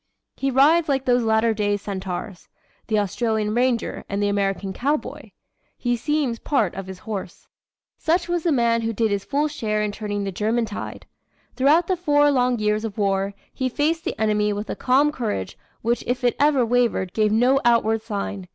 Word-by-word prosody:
He 275 Hz, -, -1 dB
rides 300 Hz, +5 st, +4 dB
like 270 Hz, -1 st, 0 dB
those 245 Hz, -1 st, +3 dB
latter 220 Hz, 0 st, +2 dB
day 205 Hz, -1 st, 0 dB
centaurs 190 Hz, -1 st, -6 dB, 0.4 s
the 220 Hz, -, +1 dB
Australian 215 Hz, +1 st, 0 dB
ranger 245 Hz, -1 st, 0 dB
and 200 Hz, -, -2 dB
the 205 Hz, 0 st, +1 dB
American 195 Hz, -1 st, -1 dB
cowboy. 290 Hz, +8 st, -2 dB, 0.5 s
He 245 Hz, -1 st, 0 dB
seems 265 Hz, -1 st, -1 dB
part 225 Hz, -, 0 dB
of 195 Hz, -1 st, -7 dB
his 190 Hz, -1 st, -7 dB
horse." 195 Hz, -3 st, -7 dB, 0.5 s
Such 345 Hz, +2 st, +1 dB
was 350 Hz, -1 st, 0 dB
the 335 Hz, -, +1 dB
man 235 Hz, -4 st, +2 dB
who 225 Hz, 0 st, -2 dB
did 225 Hz, 0 st, 0 dB
his 200 Hz, -1 st, -1 dB
full 290 Hz, +2 st, 0 dB
share 215 Hz, -7 st, -2 dB
in 210 Hz, -, -1 dB
turning 205 Hz, -1 st, -4 dB
the 195 Hz, -, -3 dB
German 220 Hz, +5 st, 0 dB
tide. 210 Hz, -, -7 dB, 0.5 s
Throughout 295 Hz, +6 st, +4 dB
the 370 Hz, -, 0 dB
four 290 Hz, -4 st, +3 dB
long 250 Hz, -2 st, +2 dB
years 210 Hz, 0 st, 0 dB
of 220 Hz, -2 st, -5 dB
war, 195 Hz, -1 st, 0 dB, 0.2 s
he 260 Hz, -1 st, -1 dB
faced 315 Hz, +5 st, 0 dB
the -, -, -4 dB
enemy 210 Hz, -1 st, +2 dB
with 205 Hz, +1 st, -4 dB
a -, -, -3 dB
calm 275 Hz, +4 st, +3 dB
courage 215 Hz, -, -3 dB, 0.3 s
which 235 Hz, +1 st, 0 dB
if 250 Hz, +1 st, -1 dB
it 245 Hz, -, +2 dB
ever 285 Hz, -4 st, +4 dB
wavered 230 Hz, -6 st, +1 dB
gave 215 Hz, -1 st, +2 dB
no 250 Hz, +5 st, +3 dB
outward 225 Hz, -2 st, +3 dB
sign. 200 Hz, -3 st, -5 dB
225 Hz, 190 wpm, -23 LUFS, 205-265 Hz, 0.5 s, rides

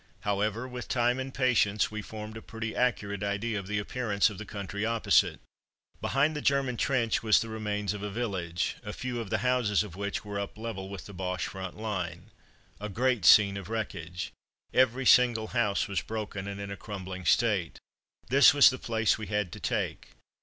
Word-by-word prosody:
However, 105 Hz, +4 st, -1 dB
with 125 Hz, -1 st, -7 dB
time 120 Hz, +1 st, +1 dB
and 130 Hz, 0 st, -4 dB
patience, 120 Hz, -6 st, +2 dB
we 110 Hz, 0 st, -4 dB
formed 110 Hz, 0 st, -8 dB
a 110 Hz, -, -7 dB
pretty 115 Hz, -1 st, -6 dB
accurate 105 Hz, -5 st, 0 dB
idea 105 Hz, +2 st, -1 dB
of 95 Hz, -, -8 dB
the 105 Hz, +1 st, -1 dB
appearance 105 Hz, -1 st, +1 dB
of 100 Hz, -, -9 dB
the 110 Hz, -, -7 dB
country 100 Hz, 0 st, -5 dB
opposite. 115 Hz, 0 st, +2 dB, 0.6 s
Behind 145 Hz, +3 st, +1 dB
the 150 Hz, -, -3 dB
German 135 Hz, -3 st, +1 dB
trench 120 Hz, -3 st, +1 dB
was 110 Hz, -2 st, +5 dB
the 115 Hz, -, -4 dB
remains 105 Hz, -2 st, -2 dB
of 105 Hz, -, -6 dB
a 105 Hz, -, -3 dB
village, 95 Hz, -6 st, -2 dB
a 105 Hz, -2 st, -6 dB
few 125 Hz, -1 st, -4 dB
of 115 Hz, -4 st, -5 dB
the 110 Hz, -, +1 dB
houses 120 Hz, -5 st, +2 dB
of 100 Hz, -5 st, -9 dB
which 100 Hz, +2 st, -3 dB
were 100 Hz, -1 st, -4 dB
up 100 Hz, +1 st, -5 dB
level 110 Hz, -4 st, -5 dB
with 100 Hz, -2 st, -8 dB
the 100 Hz, -, -10 dB
Boche 90 Hz, 0 st, -3 dB
front 95 Hz, -2 st, -6 dB
line. 90 Hz, -6 st, -4 dB, 0.5 s
A 105 Hz, +1 st, -5 dB
great 120 Hz, -2 st, +1 dB
scene 100 Hz, -2 st, +7 dB
of 100 Hz, 0 st, -7 dB
wreckage. 90 Hz, -5 st, -4 dB, 0.4 s
Every 130 Hz, +1 st, +3 dB
single 120 Hz, -4 st, +5 dB
house 110 Hz, -5 st, +1 dB
was 100 Hz, -2 st, -1 dB
broken, 105 Hz, -3 st, -5 dB
and 100 Hz, 0 st, -5 dB
in 100 Hz, 0 st, -5 dB
a -, -, -4 dB
crumbling 95 Hz, -3 st, -7 dB
state. 105 Hz, -9 st, +2 dB, 0.5 s
This 140 Hz, +3 st, +7 dB
was 140 Hz, -, +8 dB
the 130 Hz, -, -6 dB
place 110 Hz, -2 st, +1 dB
we 105 Hz, -, -5 dB
had 105 Hz, -3 st, -1 dB
to -, -, -8 dB
take. -, -, -3 dB
105 Hz, 195 wpm, -29 LUFS, 100-120 Hz, 0.6 s, was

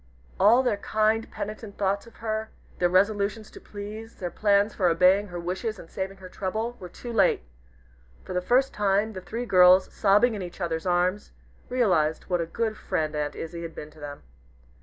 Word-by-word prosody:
All 230 Hz, +6 st, +6 dB
their 245 Hz, -5 st, +1 dB
kind, 215 Hz, +2 st, +1 dB
penitent 215 Hz, 0 st, -7 dB
thoughts 200 Hz, +2 st, 0 dB
of 230 Hz, -, -16 dB
her; 220 Hz, 0 st, -3 dB, 0.3 s
their 175 Hz, -, +3 dB
resolutions 205 Hz, +3 st, +1 dB
to -, -, -12 dB
please 215 Hz, +2 st, -8 dB
their 175 Hz, -2 st, -5 dB
plans 205 Hz, +2 st, +2 dB
for 185 Hz, -, +1 dB
obeying 185 Hz, +4 st, +4 dB
her 175 Hz, -2 st, -6 dB
wishes 190 Hz, +6 st, -3 dB
and 165 Hz, -, -13 dB
saving 195 Hz, 0 st, -4 dB
her 190 Hz, -1 st, -10 dB
trouble, 220 Hz, +6 st, -3 dB
were 180 Hz, -, -8 dB
too 240 Hz, +6 st, -8 dB
late! 195 Hz, -, +3 dB, 0.8 s
For -, -, -6 dB
the 180 Hz, -, 0 dB
first 255 Hz, +7 st, +2 dB
time, 205 Hz, +2 st, +1 dB
the 185 Hz, -, -6 dB
three 230 Hz, +6 st, -5 dB
girls, 185 Hz, -2 st, +6 dB
sobbing 210 Hz, +4 st, +4 dB
in 205 Hz, -, -4 dB
each 175 Hz, 0 st, -8 dB
other's 170 Hz, 0 st, -2 dB
arms, 180 Hz, +3 st, 0 dB, 0.4 s
realized 180 Hz, -11 st, +2 dB
what 175 Hz, -1 st, +2 dB
a 165 Hz, -, -3 dB
good 220 Hz, +4 st, -2 dB
friend 155 Hz, -1 st, -2 dB
Aunt 150 Hz, -1 st, -2 dB
Izzie 170 Hz, +1 st, -6 dB
had 165 Hz, -1 st, -7 dB
been 150 Hz, -, -8 dB
to 155 Hz, -, -18 dB
them. 145 Hz, -1 st, -8 dB
195 Hz, 190 wpm, -26 LUFS, 180-220 Hz, 0.8 s, All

